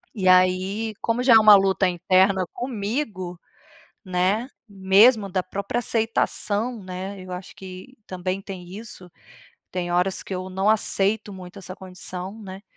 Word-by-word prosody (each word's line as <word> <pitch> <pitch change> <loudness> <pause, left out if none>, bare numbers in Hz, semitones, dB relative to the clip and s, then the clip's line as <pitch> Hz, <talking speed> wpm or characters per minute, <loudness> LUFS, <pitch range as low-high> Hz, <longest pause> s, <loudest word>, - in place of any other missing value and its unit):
E 190 -3 -1
aí, 185 +4 +3
como 230 +2 0
já 255 - +6
é 225 - +10
uma 215 -1 +9
luta 195 -1 +3
interna 185 +1 +2
comigo, 210 - -4 0.6
né, 190 +5 0 0.2
mesmo 200 +2 +4
da 185 0 0
própria 200 +5 -3
aceitação, 225 0 -1
né, 190 +2 -6
eu 185 - -10
acho 180 +1 -8
que 190 +7 -11
também 185 +1 -3
tem 185 -3 -9
isso, 205 -4 -10 0.6
tem 175 -1 -3
horas 180 +2 0
que 190 - -6
eu 185 +1 -5
não 190 +2 -1
aceito 205 -1 +1
muito 185 +1 -10
essa 185 -1 -9
condição, 185 +2 -8
né? 190 0 -9
195 Hz, 145 wpm, -23 LUFS, 185-215 Hz, 0.6 s, é